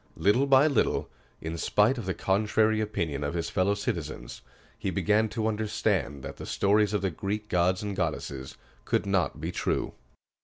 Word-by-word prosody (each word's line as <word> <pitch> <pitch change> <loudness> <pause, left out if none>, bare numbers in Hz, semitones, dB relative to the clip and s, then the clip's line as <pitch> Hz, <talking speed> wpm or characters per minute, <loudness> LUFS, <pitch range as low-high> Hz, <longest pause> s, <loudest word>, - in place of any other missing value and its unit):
Little 120 +8 +3
by 135 +1 +6
little, 140 -7 +1 0.3
in 80 +1 -4
spite 115 +5 +3
of 105 - -6
the 95 - -1
contrary 110 +2 +2
opinion 85 -9 -2
of 70 +4 -2
his 85 -1 -2
fellow 95 +2 +2
citizens, - - -4 0.3
he - - -3
began 110 +1 +2
to 110 0 -2
understand 105 -9 -1
that 70 - -7
the - - -8
stories 105 +1 +2
of 100 - -1
the 95 - +1
Greek 105 +5 -4
gods 90 +2 +2
and 100 -1 -3
goddesses 70 -6 -3 0.3
could - - 0
not 95 -2 0
be - - -3
true. - - -1
100 Hz, 170 wpm, -28 LUFS, 85-110 Hz, 0.3 s, by